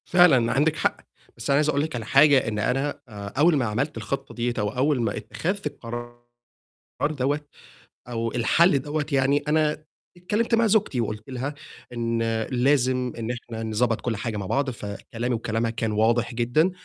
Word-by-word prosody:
فعلًا 145 -10 +5
عندِك 150 +3 +2
حق، - - 0 0.4
بس 115 - -6
أنا 140 - +4
عايز 150 +1 +3
أقول 140 -1 +1
لِك 155 -2 -3
على 115 -2 -4
حاجة، 140 +1 +5
إن 105 -2 -2
أنا 135 +6 -1
آآ، 100 -2 -7
أول 160 +3 +5
ما 130 - +1
عملت 120 +6 -2
الخطة 135 +5 -4
ديّة 120 0 -1
أو 105 0 0
أول 130 +2 +1
ما 110 -3 -1
اتخذت 200 +4 -3
القرار 120 0 -7 0.9
دوَّة 145 0 0 0.7
أو 115 -1 -2
الحَلّ 140 +6 +3
دوَّة 150 +2 -2
يعني، 140 +1 +2
أنا 155 0 +1 0.3
اتكلّمت 210 +6 0
مع 230 0 +3
زوجتي 200 - +2
وقُلت 110 +1 -5
لها 130 +3 -3 0.4
إن 115 -1 -1 0.3
لازم 125 -1 +2
إن 115 +1 -2
إحنا 115 -2 -6
نضبّط 110 +1 0
كل 120 -2 -1
حاجة 110 0 -3
مع 100 - -4
بعض، 135 +8 0
فكلامي 115 +2 -4
وكلامها 115 0 -1
كان 115 -1 -2
واضح 115 +3 +2
جدًا، 125 +10 +2
125 Hz, 170 wpm, -25 LUFS, 115-145 Hz, 0.9 s, فعلًا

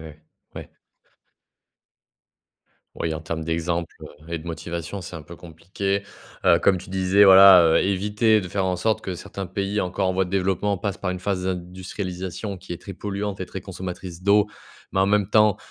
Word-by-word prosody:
ouais, 75 -1 -12 0.4
ouais. - - -19 2.3
Oui, 80 -1 -2
en 80 - -5
termes 80 0 -4
d'exemples 85 +1 -2 0.3
et 85 - -3
de 80 - -12
motivation 85 +3 -5
c'est 90 -1 -8
un 80 - -9
peu 85 +3 -11
compliqué. 90 +4 -4 0.4
Heu, - - +6
comme 95 - +3
tu 90 - -10
disais, 95 +2 +4
voilà, 95 -2 +9
heu, 80 -1 +4
éviter 105 +3 +2
de 90 - -6
faire 95 +1 -1
en 90 -1 0
sorte 110 +5 0
que 95 - -5
certains 95 +2 -7
pays 100 +3 -2
encore 90 +1 -1
en - - +1
voie 95 0 0
de - - -10
développement 95 +1 0
passent 100 +1 -4
par 90 - -2
une 90 - -4
phase 90 0 -2
d'industrialisation 95 +1 -5
qui 90 - -7
est - - -7
très 100 - -8
polluante 100 0 -4
et 95 - -3
très 95 - -7
consommatrice 90 -2 -7
d'eau, 100 +1 +4 0.5
mais 95 - +1
en 95 - +4
même 105 0 +2
temps, 105 -1 +4
95 Hz, 185 wpm, -23 LUFS, 85-100 Hz, 2.3 s, voilà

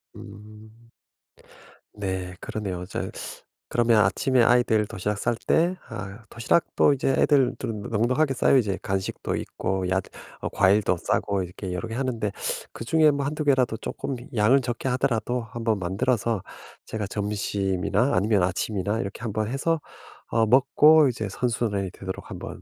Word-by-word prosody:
음. 110 +3 -13 1.0
네 95 -2 -4
그러네요. 100 -4 -4
어 - - -5
저 95 - -4 0.6
그러면 115 -2 +3
아침에 130 -2 +2
아이들 115 -3 +3
도시락 100 +2 -3
쌀 115 - 0
때 170 +9 +1
아 105 0 -7
도시락도 145 +5 +2
이제 135 0 -1
애들 135 -3 +3
2 125 - -3
은 105 -2 -6
넉넉하게 130 +8 +1
싸요 135 - +4
이제. 105 -7 +1
간식도 95 -1 -2
있고 95 0 -3
얏 95 +1 +1 0.4
어 - - -2
과일도 100 -1 +3
싸고 95 +3 0
이렇게 90 +1 -7
여러 90 - -4
개 115 - -6
하는데 120 -6 -1 0.4
그중에 155 +6 +3
뭐 140 -1 -2
1-2 150 +2 -2
개라도 130 -6 +2
쪼끔 135 - -4 0.2
양을 115 +6 +4
적게 120 +1 -3
하더라도 125 -1 0
한번 115 -2 -1
만들어서 100 +3 0 0.4
제가 110 -2 -4
점심이나 100 +2 0
아니면 100 +1 +2
아침이나 100 +3 -1
이렇게 100 -2 -5
한번 110 -2 -2
해서 155 +6 0 0.5
어 115 -1 +2
먹고 140 +4 +6
이제 110 -4 -3
선순환이 100 -4 -1
되도록 95 -1 -7
한번 - - -7
110 Hz, 315 characters per minute, -25 LUFS, 100-125 Hz, 1.0 s, 먹고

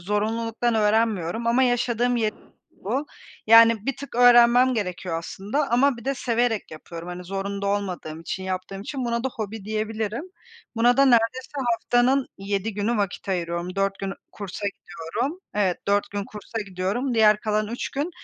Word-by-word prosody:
zorunluluktan 225 +4 -1
öğrenmiyorum 220 -1 +1
ama 240 +3 +3
yaşadığım 245 0 +1
yer 215 -2 +1 0.4
bu. 265 +9 -3 0.4
Yani, 230 0 +7
bir 275 - -1
tık 280 -3 -9
öğrenmem 245 +1 +6
gerekiyor 180 -5 -3
aslında 210 - -3
ama 255 +2 +3
bir 235 - -11
de 275 - 0
severek 240 -3 0
yapıyorum, 165 +2 -9
hani, 180 0 -7
zorunda 200 +1 -3
olmadığım 185 -6 -3
için 190 +3 -5
yaptığım 190 +1 -4
için 260 +2 -4
buna 235 +1 -1
da - - +2
hobi 215 -1 -6
diyebilirim. 220 - -3 0.5
Buna 240 +2 +4
da 275 - +6
neredeyse 245 +1 +2 0.2
haftanın 245 +3 +2
7 200 +1 -2
günü 210 +3 0
vakit 200 -1 -3
ayırıyorum, 175 0 -2
4 195 0 0
gün 195 0 -3 0.2
kursa 200 0 -5
gidiyorum. 200 - -4
Evet, 190 -4 +1
4 200 0 +1
gün 200 0 -3
kursa 215 +3 -7
gidiyorum, 205 +8 -1
diğer 215 -1 +5
kalan 215 -1 0
3 235 - -4
gün 290 +5 -2
215 Hz, 160 wpm, -24 LUFS, 195-240 Hz, 0.5 s, Yani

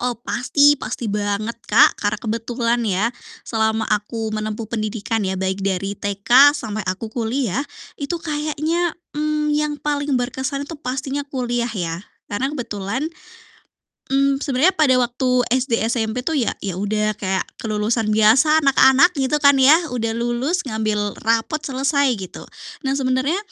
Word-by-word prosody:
Oh, 245 -1 -1
pasti, 285 +4 +2
pasti 220 -2 -4
banget, 210 +2 -1 0.2
Kak, 270 +8 +6
karena 205 0 0
kebetulan 230 +1 -1
ya, 205 +6 0 0.3
selama 220 -1 0
aku 220 +1 -2
menempuh 215 +1 -3
pendidikan 220 0 -3
ya, 190 -1 -2
baik 190 +1 -2
dari 195 0 -1
TK 240 +9 +4
sampai 215 -5 -4
aku 215 +4 -4
kuliah, 240 0 -1 0.4
itu 290 +5 -2
kayaknya, 310 +2 -2 0.2
mmm, 300 0 -1
yang 300 0 0
paling 290 -2 -1
berkesan 265 +3 -3
itu 285 - -9
pastinya 265 +1 -3
kuliah 245 -3 -2
ya, 175 -6 -4 0.3
karena 260 +7 0
kebetulan 230 -2 -4 1.1
mmm, 275 0 +2
sebenarnya 280 +7 +2
pada 260 -5 +4
waktu 250 0 +1
SD, 250 -1 +1
SMP 235 +2 -2
tuh 320 - +1
ya 255 -6 +1
ya 195 -3 -4
udah 210 +2 -1
kayak 190 -2 -2 0.2
kelulusan 215 +1 0
biasa 260 +9 +5
anak-anak, 275 +4 +5
gitu 275 +1 +1
kan, 280 -1 +6
ya. 290 +5 +7 0.2
Udah 230 -1 -1
lulus, 240 +9 -1
ngambil 215 -2 -1
rapot, 230 +7 0
selesai, 275 +1 +1
gitu. 185 -2 -8 0.4
Nah, 270 0 0
sebenarnya 260 +5 0
245 Hz, 145 wpm, -20 LUFS, 215-280 Hz, 1.1 s, ya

